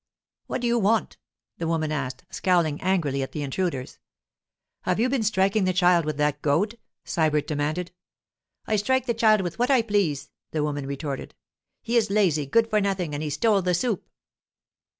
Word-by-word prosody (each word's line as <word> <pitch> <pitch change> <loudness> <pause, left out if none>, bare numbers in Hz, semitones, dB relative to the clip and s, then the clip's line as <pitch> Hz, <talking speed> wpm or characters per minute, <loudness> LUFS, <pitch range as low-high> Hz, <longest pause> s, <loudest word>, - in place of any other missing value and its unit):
'What - - -3
do 240 - 0
you 235 0 +2
want?' 215 +1 +1 0.4
the 165 - -2
woman 160 -2 0
asked, 140 -4 -3
scowling 170 -5 +1
angrily 165 -8 0
at 135 - -5
the 150 - -3
intruders. 140 -2 -3 0.8
'Have 180 +2 0
you 245 +3 +2
been 265 -2 0
striking 200 -1 +2
the 185 - +1
child 175 -2 +4
with 155 -2 -3
that 150 -1 0
goad?' 200 +11 +1 0.3
Sybert 155 -3 +1
demanded. 155 +4 -2 0.7
'I 215 - +1
strike 260 +5 +1
the 240 - 0
child 215 -2 +4
with 175 0 -5
what 245 - +2
I 260 -4 +4
please,' 200 -10 0 0.2
the 155 -2 -1
woman 145 -2 -2
retorted. 140 0 -5 0.5
'He 235 +1 +1
is 220 -3 +2
a - - -2
lazy 165 -9 +2
good 225 +9 +3
for 215 -2 +1
nothing 190 -6 -1
and 145 - -3
he 155 - -2
stole 200 +8 +2
the 180 -1 +1
soup. 220 +1 -2
180 Hz, 185 wpm, -25 LUFS, 150-215 Hz, 0.8 s, child